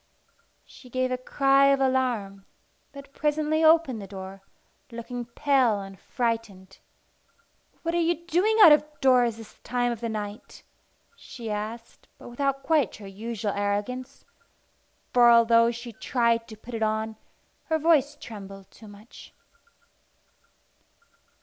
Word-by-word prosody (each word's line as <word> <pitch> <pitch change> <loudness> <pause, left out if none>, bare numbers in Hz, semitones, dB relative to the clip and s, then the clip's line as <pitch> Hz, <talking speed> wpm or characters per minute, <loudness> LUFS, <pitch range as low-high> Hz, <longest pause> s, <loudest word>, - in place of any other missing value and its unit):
She 255 - -16
gave 255 +1 -1
a - - +1
cry 275 +1 +3
of 275 0 +3
alarm, 245 -7 -1 0.4
but 280 -1 -13
presently 305 +1 0
opened 315 -8 +4
the 195 - -9
door, 190 0 -9 0.5
looking 240 +1 -6
pale 245 -3 +1
and 195 -1 -10
frightened. 225 -6 -4 1.0
"What 335 0 -2
are 345 - +1
you 340 0 -1
doing 365 +7 +1
out 325 - +10
of 300 - +6 0.2
doors 250 -4 +3
this 225 -2 -14
time 245 0 -1
of 235 -1 -6
the 230 - -3
night?" 210 -1 -7 0.5
she 230 -3 -8
asked, 220 +3 -7
but - - -12
without 275 +2 -2
quite 300 -6 +1
her 205 - -12
usual 210 +2 -5
arrogance, 205 +5 -3 0.9
for, 240 -1 +6
although 230 0 +5
she 235 0 -7
tried 235 0 0
to 220 - -11
put 235 +3 -12
it 225 - -4
on, 220 0 -1 0.5
her 320 - 0
voice 295 -3 +2
trembled 195 -3 -11
too 220 - -15
much. 205 +3 -15
235 Hz, 135 wpm, -26 LUFS, 215-275 Hz, 1.0 s, out